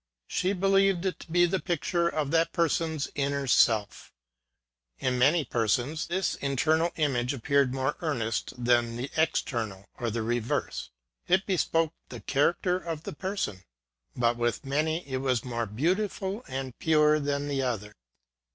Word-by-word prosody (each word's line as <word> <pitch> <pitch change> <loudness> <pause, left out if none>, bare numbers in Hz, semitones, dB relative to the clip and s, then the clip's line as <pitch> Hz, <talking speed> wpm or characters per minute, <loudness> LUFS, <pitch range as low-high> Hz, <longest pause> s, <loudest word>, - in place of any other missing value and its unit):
She 185 +2 0
believed 195 -1 +3
it 190 - -1
to - - -12
be 175 +1 +5
the 185 +2 0
picture 170 0 0
of 150 -4 -2
that 165 0 +2
person's 160 -3 0
inner 140 0 -1
self. 110 -6 +2 0.9
In 125 -1 0
many 150 +4 +4
persons, 120 +7 0
this 185 +2 0
internal 155 +5 +1
image 135 -4 0
appeared 140 +1 +2
more 135 +2 -1
earnest 120 -9 -1
than 120 -1 +2
the 130 +3 -4
external, 110 -10 -1
or 120 - -1
the 115 +1 -2
re 120 +2 0
verse: 115 - -3 0.4
it 190 +2 +3
bespoke 165 -4 +1 0.2
the - - -7
character 175 +5 +1
of 165 -3 -5
the - - -6
person; 185 - -3 0.5
but, 120 -1 +1
with 120 +3 -1
many, 155 +4 -1
it 130 -1 -2
was 130 -3 0
more 120 -2 -2
beautiful 190 - -1
and 130 -2 -5
pure 155 -1 +4
than 145 0 -1
the 140 -2 -1
other. 110 -5 -3
145 Hz, 150 wpm, -28 LUFS, 120-170 Hz, 0.9 s, be